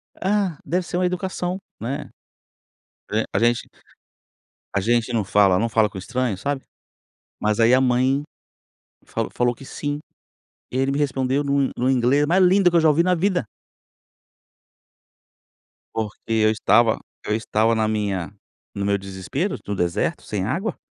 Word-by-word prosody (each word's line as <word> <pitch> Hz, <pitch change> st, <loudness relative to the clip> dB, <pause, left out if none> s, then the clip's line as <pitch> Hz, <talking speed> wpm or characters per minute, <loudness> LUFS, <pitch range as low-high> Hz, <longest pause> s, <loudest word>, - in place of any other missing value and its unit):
Ah, 195 Hz, -5 st, 0 dB
deve 180 Hz, +5 st, 0 dB
ser 175 Hz, -, -3 dB
uma 185 Hz, -, +2 dB
educação, 180 Hz, 0 st, -2 dB, 0.2 s
né, 135 Hz, +6 st, -4 dB, 1.2 s
a -, -, +1 dB
gente 120 Hz, +2 st, +1 dB, 1.1 s
a -, -, +3 dB
gente 120 Hz, +3 st, +1 dB
não 110 Hz, -3 st, +1 dB
fala, 95 Hz, -1 st, +4 dB
não 115 Hz, -, +1 dB
fala 110 Hz, -1 st, +3 dB
com 95 Hz, -, -8 dB
estranhos, 110 Hz, 0 st, -2 dB
sabe, 140 Hz, -1 st, -2 dB, 0.8 s
mas 105 Hz, 0 st, +1 dB
aí 115 Hz, +1 st, +5 dB
a 130 Hz, -, +5 dB
mãe, 130 Hz, +2 st, +2 dB, 0.8 s
falou -, -, -3 dB
falou 120 Hz, 0 st, +1 dB
que 135 Hz, -, -13 dB
sim, 145 Hz, +2 st, -4 dB, 0.7 s
e 125 Hz, -, -2 dB
ele 135 Hz, +1 st, +1 dB
me 140 Hz, -, -1 dB
respondeu 135 Hz, -1 st, 0 dB
no 140 Hz, -1 st, +1 dB
no 125 Hz, +2 st, +1 dB
inglês 135 Hz, +3 st, +3 dB
mais 180 Hz, +5 st, +4 dB
lindo 185 Hz, 0 st, +5 dB
que 175 Hz, -, +2 dB
eu -, -, +4 dB
já 160 Hz, -, +5 dB
ouvi 155 Hz, +3 st, +4 dB
na 180 Hz, 0 st, +3 dB
vida. 180 Hz, -1 st, +1 dB, 2.5 s
Porque 110 Hz, -2 st, -3 dB
eu 110 Hz, -1 st, +4 dB
estava 110 Hz, +1 st, +3 dB, 0.3 s
eu 105 Hz, -, 0 dB
estava 110 Hz, 0 st, +1 dB
na 110 Hz, -1 st, +1 dB
minha 100 Hz, -4 st, -2 dB, 0.4 s
no 100 Hz, -, -2 dB
meu 100 Hz, 0 st, +2 dB
desespero, 100 Hz, -, -3 dB
no 100 Hz, -, -2 dB
deserto, 90 Hz, -2 st, -1 dB
sem 95 Hz, -3 st, -3 dB
água. 185 Hz, -, -2 dB
125 Hz, 155 wpm, -22 LUFS, 110-150 Hz, 2.5 s, aí